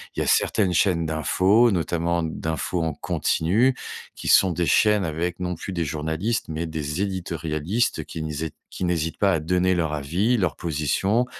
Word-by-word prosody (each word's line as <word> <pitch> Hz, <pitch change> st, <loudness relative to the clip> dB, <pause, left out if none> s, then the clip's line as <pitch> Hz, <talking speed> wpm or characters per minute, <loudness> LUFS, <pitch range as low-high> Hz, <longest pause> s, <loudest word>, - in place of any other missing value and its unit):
Il -, -, -1 dB
y -, -, +2 dB
a -, -, -4 dB
certaines 100 Hz, -4 st, +2 dB
chaînes 85 Hz, -2 st, +2 dB
d'infos, 95 Hz, -, +3 dB
notamment 85 Hz, -2 st, 0 dB
d'infos 80 Hz, +2 st, -2 dB
en 80 Hz, -2 st, -1 dB
continu, 100 Hz, -, +1 dB, 0.4 s
qui -, -, -5 dB
sont 95 Hz, -, +6 dB
des 85 Hz, +1 st, -1 dB
chaînes 105 Hz, +6 st, +4 dB
avec 85 Hz, +1 st, -2 dB
non 90 Hz, -1 st, -2 dB
plus 95 Hz, +4 st, -6 dB
des 85 Hz, -2 st, -1 dB
journalistes. 80 Hz, +9 st, -2 dB
Mais 80 Hz, +1 st, -3 dB
des 80 Hz, +1 st, -3 dB
éditorialistes 85 Hz, +1 st, -2 dB
qui 80 Hz, -, -7 dB
n'hésitent 80 Hz, 0 st, -4 dB, 0.2 s
qui 95 Hz, -, -4 dB
n'hésitent 80 Hz, -2 st, -1 dB
pas 100 Hz, -2 st, +3 dB
à 80 Hz, -, +1 dB
donner 90 Hz, +3 st, +1 dB
leur 80 Hz, -3 st, 0 dB
avis, 85 Hz, -, 0 dB
leur 90 Hz, -5 st, 0 dB
position, 85 Hz, -, 0 dB
85 Hz, 175 wpm, -24 LUFS, 80-95 Hz, 0.4 s, sont